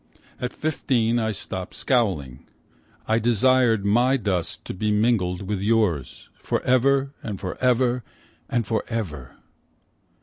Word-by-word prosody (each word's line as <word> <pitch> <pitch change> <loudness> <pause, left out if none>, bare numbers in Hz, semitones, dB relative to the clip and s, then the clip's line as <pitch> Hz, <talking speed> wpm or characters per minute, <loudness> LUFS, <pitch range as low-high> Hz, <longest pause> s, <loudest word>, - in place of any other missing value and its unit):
At 125 0 -3
fifteen 120 -7 0
I 110 -1 0
stopped 95 -2 -6
scowling, 85 - 0 0.6
I 110 +1 +2
desired 120 -1 +3
my 120 +6 +3
dust 95 -8 -2
to - - -5
be 105 +3 -1
mingled 105 -4 +1
with 100 0 -3
yours 100 - 0
Forever 135 +2 +1
and 100 -4 -5
forever, 125 +5 +1 0.5
and 120 -2 0
forever. 95 - -4
110 Hz, 110 wpm, -24 LUFS, 95-125 Hz, 0.6 s, desired